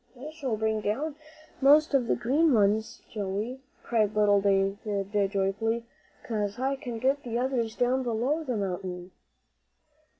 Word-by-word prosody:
"I 295 +4 -7
shall 275 -8 -3
bring 220 0 0
down 280 +9 -2 0.5
most 295 +3 +5
of 255 -4 +3
the - - +2
green 290 +3 +2
ones, 215 +2 +1
Joey," 210 +5 -4 0.2
cried 215 -3 +1
little 205 -1 +4
David, 200 0 0
joyfully, 205 +4 -1 0.4
"'cause 210 -2 -2
I 265 +2 0
can 250 -4 -6
get 270 +4 +1
the 235 -3 -3
others 240 -3 -1
down 250 +2 +1
below 250 +6 0
the 250 -6 -2
mountain." 180 -2 -4
225 Hz, 140 wpm, -28 LUFS, 205-260 Hz, 0.5 s, most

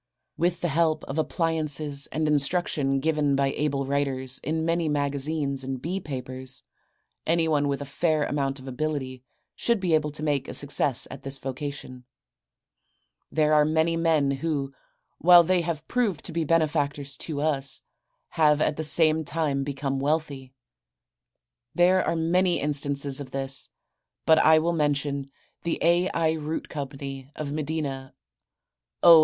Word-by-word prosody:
With 175 +2 0
the 175 - +1
help 160 0 +1
of 140 +4 -4
appliances 155 -3 0
and 155 0 -2
the 150 - +2
instruction 145 -2 +1
given 150 -2 +1
by 135 0 +1
able 140 -2 -1
writers 130 -2 -2
in 160 +2 -1
many 165 -1 +1
magazines 140 -1 -1
and 130 0 -4
bee 175 +8 -3
papers 130 -4 -5 0.6
anyone 160 -3 +2
with 140 0 -2
a - - -8
fair 155 +2 0
amount 140 -2 -1
of 130 - -11
ability 130 -1 -3 0.3
should 235 -2 +1
be 180 -3 0
able 155 -1 +2
to 150 - -7
make 145 -3 0
a - - -4
success 140 -2 +2
at 135 - -8
this 135 0 -2
vocation. 135 -1 -6 1.3
There 155 -1 +2
are 150 -1 +6
many 160 +2 +1
men 160 -4 +2
who, 140 -1 -2 0.5
while 175 0 +8
they 180 +1 +2
have 165 -2 -4
proved 220 -10 -1
to - - -4
be 165 0 -1
benefactors 145 -3 0
to 155 -3 -4
us, 140 -3 0 0.5
have 150 -3 +3
at 150 - +1
the 160 - -2
same 155 +1 +4
time 145 -3 -1
become 135 -1 -3
wealthy. 140 -2 -2 1.2
There 180 +1 +4
are - - 0
many 175 +2 +2
instances 140 -1 0
of 135 - -8
this, 135 0 -1 0.6
but 160 0 +6
I 160 0 +6
will 170 +2 +1
mention 145 -3 -1 0.3
The 170 - -1
A. 175 +2 +3
I. 160 -1 +1
Root 155 0 -4
Co., 140 -3 -4 0.5
of 145 -2 -4
Medina, 145 -3 -4 0.9
O. 170 -2 +10
150 Hz, 150 wpm, -26 LUFS, 140-160 Hz, 1.3 s, O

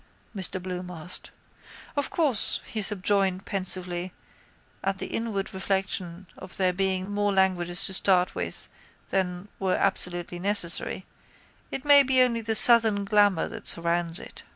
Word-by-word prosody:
Mr 185 -1 +2
Bloom 180 0 -7
asked. 175 0 -7 0.7
Of 285 -1 -2
course, 285 -10 0
he 220 - -5
subjoined 195 -1 0
pensively, 185 -2 -4 0.7
at 195 0 -1
the - - -4
inward 215 -4 -4
reflection 190 -2 -3
of 185 - -7
there 185 -1 +1
being 190 0 -1
more 205 0 0
languages 180 -2 +1
to 190 - +3
start 185 -1 +4
with 85 -1 -3 0.4
than 180 0 -3
were 190 -1 0
absolutely 175 0 0
necessary, 190 -1 -2 0.6
it 270 - -6
may 285 -1 +9
be 265 -1 +2
only 240 -2 +2
the 220 0 0
southern 220 -3 +6
glamour 205 -4 +2
that - - -8
surrounds 170 0 +2
it. - - -9
190 Hz, 140 wpm, -25 LUFS, 180-205 Hz, 0.7 s, may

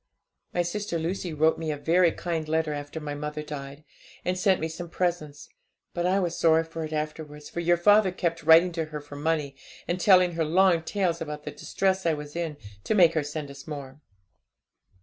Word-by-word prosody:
'My 175 - +1
sister 175 0 -3
Lucy 175 +2 -3
wrote 160 +1 +2
me 160 -1 -3
a 150 - -3
very 170 +3 +3
kind 165 -3 -3
letter 160 -1 0
after 145 +2 -6
my 150 -1 -5
mother 150 +1 -5
died, 140 -1 -8 0.4
and 180 - 0
sent 185 0 +2
me 160 - -1
some 170 +2 -7
presents; 170 -5 -2 0.5
but 175 0 0
I 190 +2 +2
was 175 -3 -1
sorry 165 0 +4
for 165 0 -6
it 155 - -6
afterwards, 150 -1 -5
for - - -4
your 175 0 +3
father 205 +2 +5
kept 170 -2 -2
writing 165 +3 +6
to 165 -1 -2
her 155 -1 -6
for 145 0 -11
money, 150 -2 -1 0.3
and 175 +1 -1
telling 180 -1 +5
her 165 -1 -1
long 175 +2 +3
tales 175 -1 -1
about 150 -2 -5
the - - -5
distress 190 -2 -1
I 160 - +2
was 150 0 -9
in, 165 -3 -3 0.3
to - - 0
make 175 -4 +6
her 155 - +1
send 150 -1 -5
us 140 +2 -12
more. 140 -2 -8
160 Hz, 205 wpm, -26 LUFS, 150-175 Hz, 0.5 s, writing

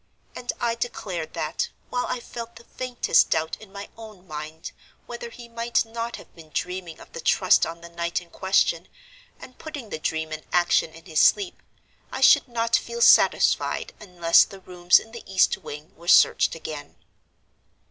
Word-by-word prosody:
And 245 - -3
I 235 -1 0
declared 195 -8 -5
that, 155 +1 -2 0.2
while 245 0 -1
I - - -2
felt 235 0 -8
the 230 - -13
faintest 245 -7 +1
doubt 160 0 0
in 210 -3 -14
my 200 0 -8
own 215 -5 -12
mind 155 0 -7 0.3
whether 235 0 -7
he 240 +1 -12
might 235 0 0
not 230 +1 -5
have - - -14
been 160 -2 -15
dreaming 180 -2 -4
of - - -15
the 485 - -6
Trust - - +3
on 165 0 -8
the 170 - -11
night 170 0 -2
in 175 -1 -17
question, 190 -2 +1 0.5
and 255 - -13
putting 290 -8 -8
the 155 - -4
dream 160 0 -2
in 155 0 -6
action 175 -2 +2
in 165 0 -15
his 160 -4 -1
sleep, 390 -3 +3 0.5
I - - -4
should - - +6
not 230 -1 0
feel 470 - -2
satisfied - - +4
unless 175 -4 +4
the 195 -1 -11
rooms 180 -1 +3
in 225 - -6
the 235 - -9
east 190 - +4
wing 150 +2 -10
were 170 +1 -15
searched - - +5
again. 155 -2 -8
190 Hz, 180 wpm, -24 LUFS, 165-235 Hz, 0.5 s, should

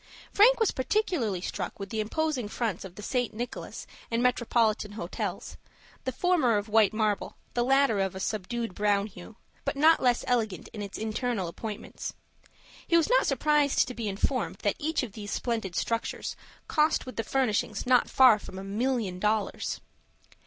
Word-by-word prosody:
Frank 475 +5 +6
was 450 - +3
particularly 260 - 0
struck 185 0 -4
with 195 0 -6
the 220 - -2
imposing 260 +2 -1
fronts 215 -3 -2
of 190 -2 -10
the 210 - -9
St. 245 -1 -1
Nicholas 240 +2 -6 0.2
and 230 +1 0
Metropolitan 230 -4 +1
Hotels, 180 -4 -5 0.5
the 260 - 0
former 285 -7 +2
of 205 +1 -3
white 215 -1 +4
marble, 215 -2 -1 0.2
the 240 - +1
latter 270 -4 +3
of 195 -1 -1
a - - -5
subdued 220 +2 -3
brown 205 0 +2
hue, 205 +1 -11 0.3
but 280 - -2
not 315 +3 +5
less 245 -2 +3
elegant 225 -7 -1
in 210 - -7
its 200 -1 -6
internal 220 -2 -2
appointments. 210 +5 -6 0.7
He 335 - +4
was 335 +7 +2
not - - +4
surprised 290 +1 +3
to 250 - -5
be 230 -3 -3
informed 225 +5 -1
that 205 - +2
each 310 -1 0
of 240 - -5
these 205 0 -8
splendid 220 -5 -2
structures 230 0 -2 0.3
cost 305 0 +2
with 255 - -8
the 225 - -1
furnishing 220 -4 0
not 250 -1 +4
far 255 -5 +6
from 190 - -10
a 190 - -6
million 210 -2 -1
dollars. 210 +1 -1
230 Hz, 170 wpm, -28 LUFS, 205-260 Hz, 0.7 s, Frank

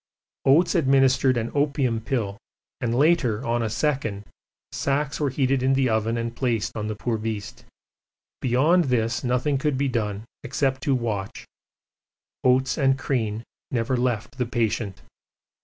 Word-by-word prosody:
Oates 150 +6 +5
administered 135 -5 +3
an 115 0 -2
opium 140 -5 +1
pill 110 -4 -2 0.4
and 120 -3 -1
later 135 -6 +2
on 120 0 0
a 110 - -1
second, 115 -4 -1 0.5
sacks 140 0 -1
were 145 -2 +1
heated 135 0 +1
in 130 +1 +3
the 135 -2 +2
oven 110 +1 0
and 115 0 -3
placed 120 -5 -1
on 105 -1 -3
the 110 - -3
poor 115 +1 -2
beast; 110 -2 -5 0.8
beyond 150 +8 +3
this 115 -3 0
nothing 130 +3 +1
could 145 -1 0
be 140 +1 +1
done 105 -4 -2 0.2
except 135 0 -1
to 140 - +1
watch 110 -6 -3 1.0
Oates 130 +3 +2
and 135 -1 +3
Crean 115 -5 -2 0.3
never 125 +1 0
left 120 0 -2
the 125 - 0
patient. 110 - -2
125 Hz, 145 wpm, -24 LUFS, 115-135 Hz, 1.0 s, Oates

